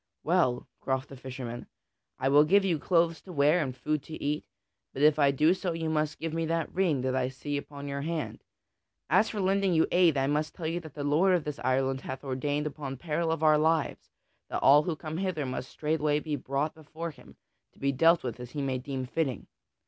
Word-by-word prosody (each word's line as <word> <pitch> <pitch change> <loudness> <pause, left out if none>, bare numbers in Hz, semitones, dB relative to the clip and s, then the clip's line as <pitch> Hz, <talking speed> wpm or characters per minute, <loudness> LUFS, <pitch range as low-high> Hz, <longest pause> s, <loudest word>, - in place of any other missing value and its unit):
"Well," 160 -8 +1
quoth 130 0 -1
the 135 - -9
fisherman, 125 -2 -7 0.5
"I 135 - -1
will 145 +2 +6
give 195 +6 +4
you 170 -5 +1
clothes 165 -1 +2
to 190 - -11
wear 150 +2 +3
and 130 -4 -3
food 150 +3 -1
to 160 - -7
eat, 150 +1 -1 0.5
but 135 - -2
if 155 0 +5
I 140 -1 +5
do 150 +5 +4
so 185 -2 -2
you 165 -1 -2
must 155 -1 0
give 165 -1 -4
me 165 0 -1
that 165 0 -1
ring 175 -8 +1
that 130 0 -1
I 130 -1 +1
see 145 +2 -5
upon 145 0 -6
your 140 0 -3
hand. 160 +1 -4 0.7
As 220 - +4
for 215 - -4
lending 195 -1 +2
you 160 - +4
aid, 175 -5 +4
I 135 - +2
must 150 +2 -1
tell 165 - -6
you 165 +2 -1
that 160 -5 -12
the 145 - -4
lord 165 +6 +3
of 170 - 0
this 150 -1 -5
island 130 +1 0
hath 130 +1 -6
ordained 145 +2 -1
upon 140 -3 -5
peril 160 +3 -1
of 160 -1 -2
our 155 -1 +5
lives 160 0 0 0.4
that - - -3
all 145 +2 +8
who 160 +1 -2
come 155 +1 -6
hither 180 -6 -1
must 130 0 -4
straightway 150 -1 0
be 150 -1 -3
brought 140 +3 -2
before 160 +2 -7
him - - -17 0.4
to - - -27
be 140 0 0
dealt 165 +5 +4
with 125 -1 -4
as 125 -1 -7
he 145 - -3
may 130 -2 -1
deem 130 0 -4
fitting. 135 -1 -2
150 Hz, 225 wpm, -29 LUFS, 135-165 Hz, 0.7 s, all